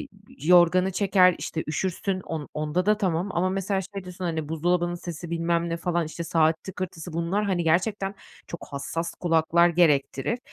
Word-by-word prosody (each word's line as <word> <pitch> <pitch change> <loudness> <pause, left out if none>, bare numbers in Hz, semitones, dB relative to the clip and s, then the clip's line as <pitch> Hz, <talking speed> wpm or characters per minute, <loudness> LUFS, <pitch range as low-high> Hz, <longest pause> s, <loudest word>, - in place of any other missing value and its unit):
ııı, 300 - -7 0.3
yorganı 180 +4 +4
çeker, 185 -2 +4
işte, 160 - -4
üşürsün, 185 +4 -2
on 160 -4 -6
onda 155 +5 -1
da 210 - +4
tamam 185 -3 -1
ama 180 +2 +1
mesela 195 0 -1
şey 195 -2 -5
diyorsun, 180 0 -8
hani, 160 -3 -2
buzdolabının 175 +2 0
sesi, 175 -1 -7
bilmem 170 0 0
ne, 165 - -2
falan, 170 -1 -1
işte, 170 +2 -6
saat 160 0 +2
tıkırtısı 180 -3 -6
bunlar, 170 +5 -1
hani, 185 -4 0
gerçekten 195 +4 +1 0.3
çok 170 - -8
hassas 165 +4 -4
kulaklar 170 0 +3
gerektirir. 155 - +2
175 Hz, 165 wpm, -25 LUFS, 165-185 Hz, 0.3 s, yorganı